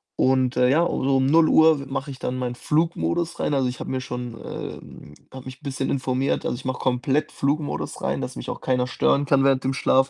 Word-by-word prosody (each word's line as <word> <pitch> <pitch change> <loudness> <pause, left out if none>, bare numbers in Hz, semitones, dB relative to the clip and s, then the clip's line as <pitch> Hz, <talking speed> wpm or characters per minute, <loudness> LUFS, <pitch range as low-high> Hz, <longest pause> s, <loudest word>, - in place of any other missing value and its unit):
und, 130 -1 +2
äh, 125 0 +4
ja, 155 +5 +4
so 135 0 +1
um 130 - +2
0:00 160 0 +5
we 140 - -7
mache 135 +1 -4
ich 135 - -7
dann 125 +1 -3
meinen 125 -1 -3
Flugmodus 165 +3 -1
rein. - - 0
Also, 135 -2 +2
ich 125 - -5
habe - - -5
mir 130 0 -2
schon 125 -1 -5
ähm, 75 -1 -8 0.2
habe 130 -1 -10
mich 130 0 -8
'n - - -32
bisschen 135 -1 -3
informiert. 130 0 -1
Also, - - -1
ich 125 - -10
mache 130 -1 -2
komplett 130 +3 0
Flugmodus 145 +2 -2
rein, - - -1
dass - - -5
mich - - -6
auch - - -5
keiner 125 -1 0
stören 140 +2 +1
kann 140 -1 +3
während 135 -1 +3
dem 135 +1 0
Schlaf. 135 0 +2
135 Hz, 230 wpm, -23 LUFS, 130-140 Hz, 0.2 s, 0:00